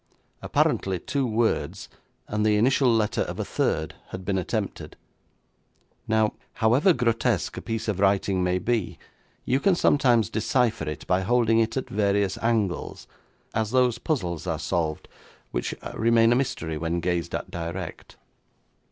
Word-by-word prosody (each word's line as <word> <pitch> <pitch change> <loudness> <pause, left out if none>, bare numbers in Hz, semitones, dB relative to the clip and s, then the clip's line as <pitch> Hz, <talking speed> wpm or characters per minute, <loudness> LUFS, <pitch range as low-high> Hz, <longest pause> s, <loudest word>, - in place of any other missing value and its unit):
Apparently 95 -1 +1
two 135 +9 -2
words 115 0 -1 0.4
and 105 0 -1
the 105 -1 +3
initial 125 +3 +3
letter 110 -2 +1
of - - -4
a - - -1
third 80 0 -1
had 95 0 -8
been 95 0 0
attempted. 90 - -4 1.1
Now, 110 -1 +2 0.2
however 125 - +4
grotesque 115 - 0
a - - -4
piece 115 -1 -4
of 100 -3 -1
writing 95 -1 +2
may 90 0 +1
be, 115 0 -1 0.5
you 130 - +2
can 190 +5 +3
sometimes 120 - +3
decipher 115 - 0
it 75 - -7
by 90 +1 +1
holding 115 +2 +3
it 115 +3 0
at 130 - -2
various 100 -1 0
angles, 110 -6 -1 0.5
as 110 -1 0
those 125 -1 +2
puzzles 90 - -2
are 80 -2 -1
solved 80 0 -2 0.4
which - - -2 0.2
remain 115 0 +4
a - - +4
mystery 120 - -2
when 85 +2 -1
gazed 85 -1 -1
at - - -5
direct. 85 +1 -6
110 Hz, 145 wpm, -25 LUFS, 90-120 Hz, 1.1 s, however